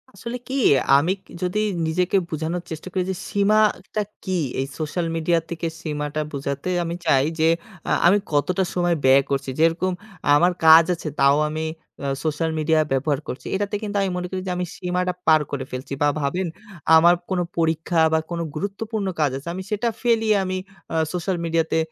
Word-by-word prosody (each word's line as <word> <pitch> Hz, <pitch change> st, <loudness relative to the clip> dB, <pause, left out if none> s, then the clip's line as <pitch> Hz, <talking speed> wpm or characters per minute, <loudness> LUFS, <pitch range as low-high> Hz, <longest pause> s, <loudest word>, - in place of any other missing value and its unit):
আসলে 235 Hz, +5 st, -5 dB
কি 265 Hz, -, -5 dB, 0.4 s
আমি 160 Hz, +6 st, +2 dB, 0.3 s
যদি 180 Hz, +3 st, 0 dB, 0.3 s
নিজেকে 180 Hz, +4 st, +1 dB
বোঝানোর 165 Hz, +3 st, -3 dB
চেষ্টা 160 Hz, +2 st, -6 dB
করি 185 Hz, -, +1 dB
যে -, -, -3 dB
সীমাটা 210 Hz, 0 st, +2 dB, 0.2 s
কি। 185 Hz, -2 st, -1 dB, 0.2 s
এই 135 Hz, -, 0 dB
সোশ্যাল 160 Hz, +3 st, -2 dB
মিডিয়া 165 Hz, +1 st, +2 dB
থেকে 170 Hz, 0 st, -3 dB
সীমাটা 150 Hz, -1 st, -3 dB
বুঝাতে 140 Hz, +3 st, -3 dB
আমি 170 Hz, 0 st, -3 dB
চাই 135 Hz, 0 st, +4 dB
যে, 160 Hz, -, +4 dB, 0.4 s
আ -, -, +1 dB, 0.2 s
আমি 195 Hz, +4 st, +6 dB, 0.2 s
কতটা 180 Hz, +6 st, +2 dB
সময় 175 Hz, -1 st, +1 dB
ব্যয় 135 Hz, +1 st, +6 dB
করছি। 135 Hz, -1 st, -1 dB
যেরকম 165 Hz, +3 st, +2 dB, 0.4 s
আমার 175 Hz, +5 st, +4 dB
কাজ 160 Hz, +1 st, +9 dB
আছে 165 Hz, -2 st, -5 dB
তাও 140 Hz, +1 st, +5 dB
আমি 155 Hz, +1 st, -3 dB, 0.4 s
আ -, -, -1 dB, 0.2 s
সোশ্যাল 160 Hz, +1 st, -1 dB
মিডিয়া 155 Hz, +1 st, +2 dB
ব্যবহার 135 Hz, +1 st, +1 dB
করছি। 125 Hz, -, -6 dB
এটাতে 205 Hz, +1 st, -1 dB
কিন্তু 205 Hz, -1 st, -4 dB
আমি 195 Hz, -, 0 dB
মনে 180 Hz, 0 st, -3 dB
করি 185 Hz, -1 st, -3 dB
যে -, -, -1 dB
আমি 180 Hz, -, -1 dB
সীমাটা 180 Hz, 0 st, -1 dB
পার 155 Hz, -1 st, +6 dB
করে 135 Hz, -2 st, -3 dB
ফেলছি 130 Hz, +2 st, -5 dB
বা 145 Hz, -, +4 dB
ভাবেন 175 Hz, +6 st, -1 dB, 0.5 s
আমার 170 Hz, +2 st, +7 dB
কোনো 185 Hz, -2 st, 0 dB
পরীক্ষা 165 Hz, +1 st, +1 dB
বা 160 Hz, -, +4 dB
কোনো 170 Hz, -1 st, -2 dB
গুরুত্বপূর্ণ 200 Hz, +4 st, -3 dB
কাজ 150 Hz, -3 st, +2 dB
আছে। 135 Hz, -, -11 dB
আমি 190 Hz, +1 st, -5 dB
সেটা 215 Hz, +3 st, 0 dB
ফেলে 225 Hz, -3 st, +3 dB
আমি 185 Hz, 0 st, -2 dB, 0.4 s
আ -, -, -1 dB, 0.2 s
সোশ্যাল 180 Hz, +1 st, -1 dB
মিডিয়াতে 165 Hz, -1 st, +1 dB
170 Hz, 180 wpm, -23 LUFS, 155-185 Hz, 0.5 s, কাজ